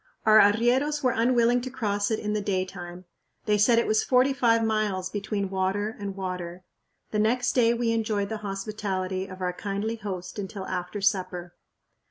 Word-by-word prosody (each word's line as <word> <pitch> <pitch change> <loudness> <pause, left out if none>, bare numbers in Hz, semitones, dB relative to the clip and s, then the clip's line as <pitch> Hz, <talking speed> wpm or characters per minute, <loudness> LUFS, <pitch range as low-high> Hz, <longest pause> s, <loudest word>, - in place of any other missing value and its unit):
Our 215 0 +7
arrieros 245 +9 +3
were 255 - +3
unwilling 240 +1 +3
to 260 - -5
cross 205 -5 -1
it 220 - 0
in 210 0 -3
the 210 - 0
daytime. 185 -2 -4 0.4
They 210 -1 +2
said 230 +3 +5
it 235 - +3
was 215 0 +2
forty 255 +2 +3
five 230 -4 +3
miles 210 -4 -1
between 200 -1 -3
water 195 +3 -1
and 200 -1 -5
water. 180 -2 -5 0.5
The 210 - 0
next 245 +3 +2
day 235 -2 +3
we 235 -1 0
enjoyed 215 -3 -1
the 220 - -3
hospitality 195 -2 -3
of 185 -1 -10
our 180 -1 -1
kindly 205 +4 -3
host 185 -2 -6
until 195 -1 -5
after 185 +2 -4
supper. 180 -3 -1
205 Hz, 175 wpm, -26 LUFS, 190-230 Hz, 0.5 s, Our